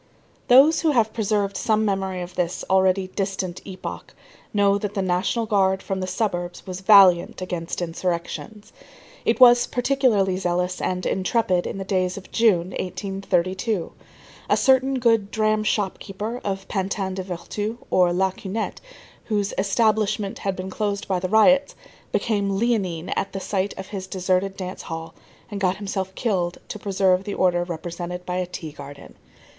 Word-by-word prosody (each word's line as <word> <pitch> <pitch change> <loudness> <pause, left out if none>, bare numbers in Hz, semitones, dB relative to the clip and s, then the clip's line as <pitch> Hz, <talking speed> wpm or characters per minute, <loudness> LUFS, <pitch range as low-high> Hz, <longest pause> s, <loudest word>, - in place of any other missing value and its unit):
Those 280 +6 +6
who 315 -3 +2
have 220 -4 +2
preserved 205 -3 0
some 215 -1 +1
memory 190 -2 -1
of 175 +1 -9
this 180 -1 -2
already 190 0 +3
distant 190 -2 -3
epoch 190 -1 -8 0.4
know 200 -1 +3
that 205 0 -4
the 195 - 0
National 185 +6 0
Guard 195 -2 +2
from 195 -1 -3
the 185 - -3
suburbs 180 -3 -3
was 185 -1 -6
valiant 190 -3 +6
against 175 -1 -4
insurrections. 180 +5 -4 0.5
It - - +2
was 245 -1 +7
particularly 245 -8 +2
zealous 180 0 -1
and 180 0 -2
intrepid 190 -2 +1
in - - -5
the 195 - -4
days 185 -1 0
of 195 - -11
June, 190 -6 +3
1832. 185 +1 -2 0.6
A - - +4
certain 265 0 +3
good 225 -5 +2
dram 215 0 +1
shop 205 -3 0
keeper 215 +5 -5
of 195 -1 -3
Pantin 195 -1 -2
des 190 - -3
Vertus 195 +5 -4
or 180 -1 +4
la 190 +2 +1
Cunette, 200 +4 -5 0.4
whose 205 -3 -1
"establishment" 210 0 +1
had 195 -1 -2
been 185 +1 -6
closed 200 0 -2
by 185 -2 0
the 185 0 -3
riots, 270 +7 +4 0.4
became 205 -3 0
leonine 195 -7 0
at 200 - -2
the 195 - -3
sight 195 +1 -2
of 190 0 -7
his 190 -2 -5
deserted 190 +1 0
dance 185 -1 -5
hall, 165 0 -7 0.4
and 200 -1 -5
got 185 0 +1
himself 190 -2 -4
killed 180 -7 -1
to 215 - -6
preserve 190 -2 +2
the 205 0 -4
order 175 -1 +2
represented 175 +1 -6
by 180 0 -2
a 180 -1 -1
tea 165 -3 -7
garden. 140 -1 -11
195 Hz, 160 wpm, -23 LUFS, 185-210 Hz, 0.6 s, was